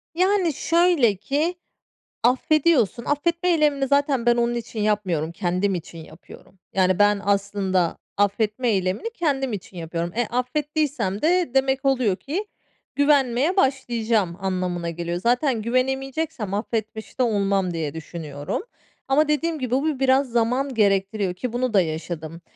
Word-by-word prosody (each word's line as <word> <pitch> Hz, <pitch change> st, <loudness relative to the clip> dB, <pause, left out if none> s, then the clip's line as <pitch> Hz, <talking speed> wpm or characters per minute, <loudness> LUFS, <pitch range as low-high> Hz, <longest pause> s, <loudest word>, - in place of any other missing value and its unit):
Yani, 370 Hz, -2 st, +2 dB
şöyle 330 Hz, -, +3 dB
ki, 290 Hz, -, -1 dB, 0.7 s
affediyorsun, 260 Hz, -, +2 dB
affetme 340 Hz, +5 st, 0 dB
eylemini 295 Hz, -5 st, +2 dB
zaten 280 Hz, -3 st, +2 dB
ben 240 Hz, 0 st, +4 dB
onun 240 Hz, 0 st, +1 dB
için 230 Hz, -1 st, -5 dB
yapmıyorum. 190 Hz, -7 st, 0 dB
Kendim 185 Hz, +3 st, -1 dB
için 170 Hz, -1 st, -7 dB
yapıyorum. 165 Hz, +3 st, -14 dB
Yani, 185 Hz, 0 st, +2 dB
ben 205 Hz, 0 st, +4 dB
aslında 200 Hz, -3 st, 0 dB, 0.2 s
affetme 210 Hz, +4 st, +1 dB
eylemini 190 Hz, -, 0 dB
kendim 270 Hz, -, -1 dB
için 190 Hz, -2 st, -7 dB
yapıyorum. 170 Hz, +1 st, -3 dB
E, 240 Hz, -1 st, 0 dB
affettiysem 270 Hz, -4 st, -1 dB
de 350 Hz, -1 st, +2 dB
demek 270 Hz, 0 st, +1 dB
oluyor 255 Hz, -8 st, +2 dB
ki, 335 Hz, -, -4 dB, 0.5 s
güvenmeye 285 Hz, +3 st, +2 dB
başlayacağım 230 Hz, -, +1 dB
anlamına 180 Hz, -3 st, -2 dB
geliyor. 170 Hz, +1 st, -3 dB
Zaten 245 Hz, 0 st, +1 dB
güvenemeyeceksem 265 Hz, -1 st, -1 dB
affetmiş 220 Hz, +2 st, -4 dB
de -, -, +4 dB
olmam 200 Hz, -5 st, +1 dB
diye 160 Hz, -3 st, -3 dB
düşünüyorum. 150 Hz, -3 st, -5 dB, 0.4 s
Ama 285 Hz, +3 st, +3 dB
dediğim 310 Hz, +1 st, 0 dB
gibi, 250 Hz, -2 st, -4 dB
bu 280 Hz, +1 st, 0 dB
biraz 265 Hz, 0 st, +3 dB
zaman 245 Hz, +4 st, 0 dB
gerektiriyor 195 Hz, -2 st, +1 dB
ki, 235 Hz, +6 st, -5 dB
bunu 245 Hz, -1 st, -1 dB
da 195 Hz, -, +5 dB
yaşadım. 160 Hz, 0 st, -5 dB
235 Hz, 135 wpm, -23 LUFS, 190-275 Hz, 0.7 s, da